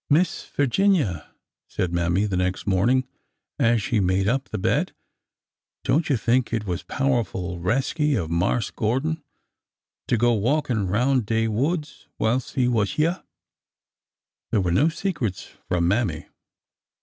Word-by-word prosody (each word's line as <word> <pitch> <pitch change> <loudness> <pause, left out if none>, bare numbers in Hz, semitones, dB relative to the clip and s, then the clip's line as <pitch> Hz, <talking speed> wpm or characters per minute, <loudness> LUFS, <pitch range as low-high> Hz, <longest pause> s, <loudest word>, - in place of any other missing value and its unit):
'' - - -60
Miss 165 +5 +2
Figinia," 140 - +1 0.4
said 85 -1 -2
Mammy, 85 +3 +1
the 100 -3 -2
next 90 +1 -1
morning, 120 +7 +2 0.5
as 115 -2 +3
she 120 -5 +1
made 95 +1 +1
up 135 +4 +1
the - - -3
bed, - - 0 0.4
'' - - -68
don't 145 +6 +1
you 135 - +3
think 120 +2 +1
it 110 -2 -1
was 90 -2 -2
powerful 95 -11 -1
resky 135 - 0
in 85 -7 -2
Marse 100 +7 0
Gordon 135 +9 -1 0.9
to 120 - +2
go 120 +2 +3
walkin' 120 -2 0
roun' 125 +7 +2
de 115 +1 0
woods 150 +8 -2
whilst 120 +4 -1
he 125 -2 +2
was 105 -6 +1
hyeah? 165 +4 0 0.7
" - - -69
There 105 - +2
were 90 -2 0
no 145 - +4
secrets 155 - -3
from 85 -1 +1
Mammy. 110 +5 0
115 Hz, 150 wpm, -24 LUFS, 95-135 Hz, 0.9 s, no